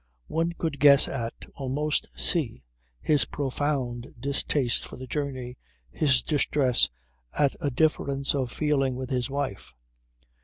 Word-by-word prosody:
One 165 +2 0
could 160 -4 -3
guess 140 -1 +8
at, 115 -3 -5
almost 145 +3 -1
see, 140 - -1 0.4
his 150 -3 +3
profound 135 -3 -2
distaste 140 -1 0
for - - -8
the 130 - -8
journey, 130 -2 -4 0.3
his 135 -4 +2
distress 140 -4 +2 0.5
at 140 -2 +3
a 145 - +1
difference 140 -1 +1
of 130 -4 -1
feeling 135 -4 +1
with 130 +1 -5
his 125 0 0
wife. 135 - -4
140 Hz, 125 wpm, -27 LUFS, 125-145 Hz, 0.5 s, guess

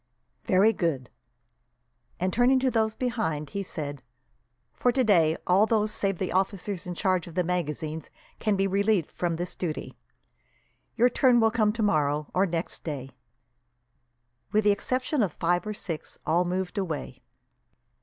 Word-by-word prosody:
"Very 200 +4 +4
good;" 155 - -2 1.1
and, 185 +1 0
turning 245 +3 +4
to 260 -1 +2
those 220 -2 +1
behind, 160 - -2
he 200 - -2
said: 145 -7 -5 0.7
"For 245 - +2
today, 195 -11 +3
all 195 +4 +4
those 215 -2 +1
save 195 -3 -1
the 185 - -2
officers 190 0 -1
in 175 - -4
charge 185 -1 0
of 170 - -11
the 180 - +2
magazines 160 -2 -3 0.3
can 215 -2 +1
be 195 0 +1
relieved 200 -2 +1
from 175 -2 -1
this 175 +2 -4
duty. 165 -4 -5 1.0
Their 240 +2 +6
turn 250 -1 +4
will 225 -1 +4
come 215 -3 +2
tomorrow, 150 -9 0
or 190 +2 +3
next 170 0 -4
day." 135 -4 -5 1.4
With 215 +1 +3
the 205 - +5
exception 255 +6 0
of 190 -7 0
five 175 +4 0
or 215 - -2
six, 165 -6 -6
all 170 +3 +2
moved 185 +2 -2
away. 170 -6 -4
185 Hz, 150 wpm, -27 LUFS, 165-215 Hz, 1.4 s, Their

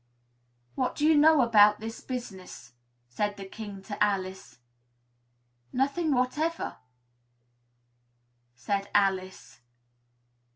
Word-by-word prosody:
"What 255 - -2
do 295 - 0
you 315 0 +5
know 305 0 +6
about 210 -3 +5
this 225 +1 -7
business?" 190 - -8 0.4
the 205 -2 -2
King 205 -3 -8
said 205 0 -7
to - - +5
Alice. 190 -5 -3 1.1
"Nothing 285 +5 0
whatever," 295 +6 -1 1.8
said 200 - -3
Alice. 190 -8 0
210 Hz, 90 wpm, -28 LUFS, 195-260 Hz, 1.8 s, know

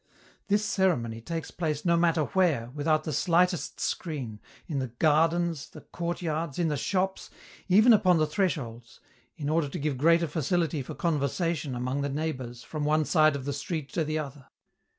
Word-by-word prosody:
This 210 +1 +2
ceremony 165 - 0
takes 165 +7 -5
place 155 -3 -3
no 170 -1 +4
matter 165 -2 +3
where, 150 -9 +1
without 155 +1 +1
the 155 - -3
slightest 175 +3 +1
screen, 130 -11 -3 0.3
in 145 -5 -2
the 130 - -2
gardens, 160 +4 +1
the - - -12
courtyards, 170 -3 -3
in 170 -2 +1
the 150 - 0
shops, 190 +6 -1 0.4
even 215 +6 +6
upon 185 -5 +4
the 155 - +3
thresholds, 140 - -3 0.4
in 145 -3 -4
order 155 -1 +1
to - - -5
give 145 -3 -2
greater 165 +3 +4
facility 160 0 0
for 130 - -7
conversation 160 -3 -1
among 125 +3 -2
the 140 - -1
neighbors 130 -5 -4
from 155 -2 -5
one 155 +1 +2
side 155 -2 +4
of 135 -2 -5
the 140 - -2
street 145 0 -4
to 165 - +1
the 155 +1 -2
other. 140 -3 -6
155 Hz, 170 wpm, -28 LUFS, 140-170 Hz, 0.4 s, even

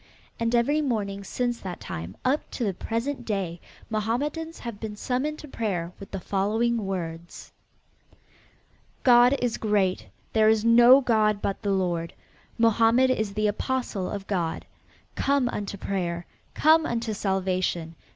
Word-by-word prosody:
And 230 +1 +1
every 285 +6 +2
morning 205 -7 -2
since 240 +4 -2
that 180 -2 -6
time 85 +2 -7
up 270 +4 +1
to 245 - -1
the 200 -3 0
present 230 +9 -3
day, 185 -5 -3 0.3
Mohammedans 285 +10 -2
have 235 -4 -7
been 215 -1 -5
summoned 260 +7 -2
to 300 - -10
prayer 190 -10 -3
with 195 - -10
the 195 - -5
following 210 +4 0
words: 170 -3 -6 1.5
"God 245 +1 +6
is 245 -2 -1
great; 205 -4 +1 0.3
there 220 -1 +5
is 220 0 +2
no 240 +3 +8
god 215 -4 +2
but 195 - -3
the 205 - -2
Lord. 175 -4 -1 0.4
Mohammed 230 +3 +4
is 215 -5 -1
the 215 0 0
Apostle 210 -2 -1
of 200 -1 -5
God. 175 -5 -2 0.5
Come 275 -2 +1
unto 205 -2 -4
prayer! 175 -3 -3 0.3
Come 315 +1 +5
unto 230 -2 -2
salvation! 185 -4 -1
215 Hz, 140 wpm, -26 LUFS, 190-240 Hz, 1.5 s, no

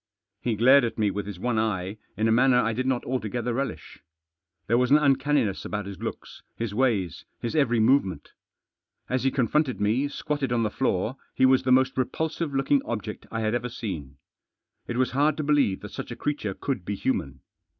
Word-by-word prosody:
He 120 -3 0
glared 130 +5 +6
at 115 - -2
me 105 -2 +2
with 100 +1 -4
his 100 -3 -6
one 120 +1 0
eye 100 -2 -1 0.2
in 110 - +2
a - - +3
manner 125 +2 +5
I 115 -2 +1
did 130 +3 -2
not 130 -2 0
altogether 120 -1 -2
relish. 135 +3 -4 0.6
There 115 +2 +2
was 125 0 +2
an 145 - +7
uncanniness. 135 -7 +2
about 105 -1 -4
his 100 -1 -8
looks, - - -6
his 115 -3 -3
ways, 105 - 0
his 120 - -3
every 125 -6 +3
movement. 110 - +2 0.8
As 130 +1 0
he - - +5
confronted 130 +2 +1
me, 110 +7 +1
squatted 145 -2 -3
on 120 -1 +2
the 105 - -1
floor, 120 0 -1 0.2
he 130 - +4
was 130 0 +5
the 130 - 0
most 130 0 +3
repulsive 160 +4 -2
looking 135 +1 +2
object 105 -2 -5
I 115 - -3
had 110 0 0
ever 120 0 -1
seen. 80 - -6 0.7
It 120 - -3
was 130 0 +1
hard 145 +3 +2
to 155 - -2
believe 145 -10 +2
that - - -8
such - - -6
a - - -5
creature 125 -10 -3
could 130 -10 -3
be 100 +3 -3
human. 70 - -2
120 Hz, 200 wpm, -26 LUFS, 105-135 Hz, 0.8 s, an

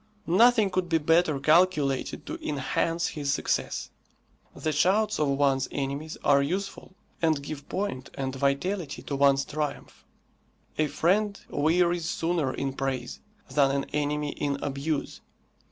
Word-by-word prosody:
Nothing 220 +2 +4
could 185 -1 -1
be 165 - +3
better 160 -1 +2
calculated 155 -3 +2
to 330 - -6
enhance 165 - -1
his 145 -2 -2
success. - - -1 0.6
The 155 - -2
shouts 200 +8 +2
of 150 - +2
one's 135 -1 +2
enemies 140 +3 -4
are 140 -1 +5
useful 190 +5 -4 0.3
and 155 -4 +2
give 145 0 -7
point 195 -10 -3
and 135 -1 -3
vitality 140 +4 -1
to 140 - -4
one's 140 0 +4
triumph. 150 0 -5 0.8
A 155 - +3
friend 200 +7 +1
wearies 170 +2 +2
sooner 165 -5 0
in 135 0 -3
praise 130 -3 -3 0.3
than 140 -2 +4
an 140 0 0
enemy 150 0 -1
in 140 -1 -2
abuse. 145 +1 -3
150 Hz, 135 wpm, -27 LUFS, 140-175 Hz, 0.8 s, are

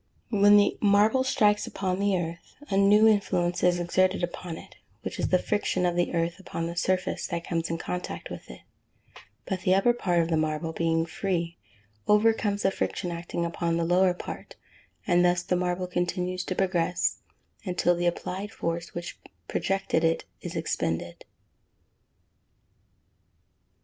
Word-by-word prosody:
When 205 -1 +6
the 205 - +3
marble 210 +5 +4
strikes 210 -5 +2
upon 185 -1 -2
the 200 -1 +2
earth, 170 -1 -6 0.2
a - - +1
new 205 +2 +6
influence 180 -5 +1
is 175 0 +3
exerted 185 +2 +1
upon 175 -1 -4
it, - - -13 0.3
which - - -5
is - - +1
the 185 - +4
friction 185 -2 0
of 175 -1 +1
the 175 0 +1
earth 170 +2 -1
upon 165 -3 -4
the 170 +1 -4
surface 185 +2 -1
that 170 -2 -3
comes 165 -2 -2
in 165 - -1
contact 180 +2 -5
with - - -9
it; - - -11 0.8
but 190 -3 -3
the 185 -1 +3
upper 220 +5 +4
part 180 -8 +1
of 165 - -4
the 160 - +2
marble, 155 +1 -1
being 165 0 +1
free, 170 -1 -2 0.5
overcomes 210 -1 +3
the 195 - +3
friction 180 -2 -2
acting 170 0 -3
upon 170 0 -1
the 170 - 0
lower 180 +1 +3
part, - - -8 0.5
and 175 -2 +3
thus 180 0 +2
the 180 - 0
marble 180 0 -1
continues 180 0 -2
to 185 - -3
progress, 180 -2 0 0.4
until 180 -2 +1
the 175 0 0
applied 185 +3 -3
force 170 -4 -4
which 175 0 -6 0.3
projected 195 -4 0
it 165 0 +1 0.2
is - - -6
expended. 85 +1 -3
180 Hz, 160 wpm, -27 LUFS, 170-195 Hz, 0.8 s, When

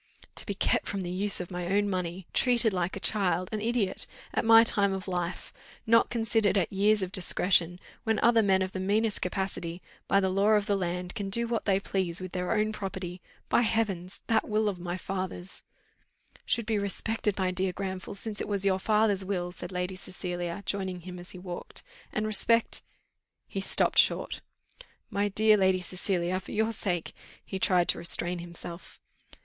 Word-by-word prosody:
"To - - -3
be 200 - -2
kept - - +1
from 200 -1 -3
the 175 -1 -4
use 200 +2 +2
of 180 0 -6
my 180 -1 -4
own 205 +2 +2
money, 180 -1 -3
treated 240 -4 +3
like 180 0 -1
a - - -4
child 185 -4 +1
an 215 -1 -2
idiot 225 -4 0 0.3
at - - +1
my 225 0 +8
time 200 -4 +2
of 190 +1 -5
life! 175 -1 -3 0.3
Not 230 0 +4
considered 225 -3 +1
at 190 0 0
years 205 +1 +3
of 185 - -4
discretion, 180 -2 +2 0.2
when 220 -2 +1
other 230 -1 +5
men 190 -2 +3
of 185 - -4
the 190 - -5
meanest 210 +3 +1
capacity, 180 -2 -3 0.3
by 195 - +4
the 190 -1 +1
law 200 +3 +3
of 210 -1 +3
the 205 - +1
land, 180 -1 -3
can 205 -4 -4
do 235 +4 0
what 230 -1 -2
they 195 -2 +3
please 185 -3 -2
with 185 -1 -6
their 180 +2 -2
own 215 -1 +1
property! 190 -3 -5 0.3
By - - +3
heavens! 200 -6 -1
that 225 0 +1
will 215 0 +1
of 185 -3 -5
my 175 +1 -4
father's 185 -1 -5 0.4
" - - -29
"Should 235 - +1
be 215 -1 0
respected, 210 +1 -1
my 185 -1 +1
dear 185 +1 -1
Granville, 190 0 -5
since 210 +1 -4
it - - -3
was 200 -1 +1
your 190 -1 +2
father's 210 -1 +2
will," 180 -2 -2
said 175 0 -7
Lady 180 +1 -3
Cecilia, 180 0 -5
joining 190 -3 -2
him 180 +1 -8
as 175 - -8
he - - -7
walked. 180 -1 -6 0.3
"And 215 - -1
respect 225 +2 +3 0.3
" - - -57 0.2
He 195 - -4
stopped 195 - +2
short. - - +2 0.7
"My 200 +1 +1
dear 215 +1 +5
Lady 190 -1 +3
Cecilia, 180 0 -1
for 190 - -10
your 220 +1 +1
sake 180 -6 -2 0.2
" - - -24
he 190 - -5
tried 180 -2 +3
to - - +2
restrain 175 +1 +3
himself. 170 0 -9
190 Hz, 195 wpm, -29 LUFS, 180-210 Hz, 0.7 s, my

